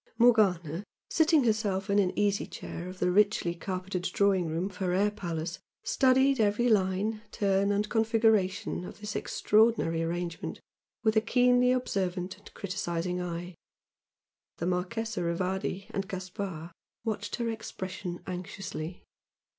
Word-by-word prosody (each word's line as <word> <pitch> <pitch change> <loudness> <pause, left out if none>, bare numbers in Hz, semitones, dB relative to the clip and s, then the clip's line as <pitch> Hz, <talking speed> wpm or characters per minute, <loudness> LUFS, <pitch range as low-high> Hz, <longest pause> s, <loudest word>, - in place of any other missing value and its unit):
Morgana, 195 -8 +4 0.3
seating 320 -2 +4
herself 210 -4 +1
in 200 +1 +3
an 185 -2 +3
easy 205 -1 +1
chair 175 - -7
of 185 - -9
the 180 - +1
richly 200 -3 +3
carpeted 185 +1 -4
"drawing 190 -1 +2
room" 165 +3 -1
of 195 -2 -6
her 185 -3 0
"air 205 +3 +3
palace," 170 -4 -4 0.2
studied 265 0 +4
every 215 +3 +3
line, 210 0 +2
turn 200 0 +2
and 205 +1 +1
configuration 220 -5 +2
of - - -9
this 210 0 -5
extraordinary 210 -7 +2
arrangement 170 0 -3 0.4
with 220 -1 +3
a 220 - +5
keenly 250 +1 +4
observant 190 -7 -1
and 205 - -15
criticising 180 -2 -2
eye. 175 +1 -4 1.0
The 170 - -3
Marchese 195 +5 -1
Rivardi 185 +3 -1
and 195 -1 -2
Gaspard 185 -3 -5 0.3
watched 220 -2 -2
her 235 -1 -1
expression 185 -5 -6
anxiously. 185 -2 -6
195 Hz, 130 wpm, -29 LUFS, 180-220 Hz, 1.0 s, a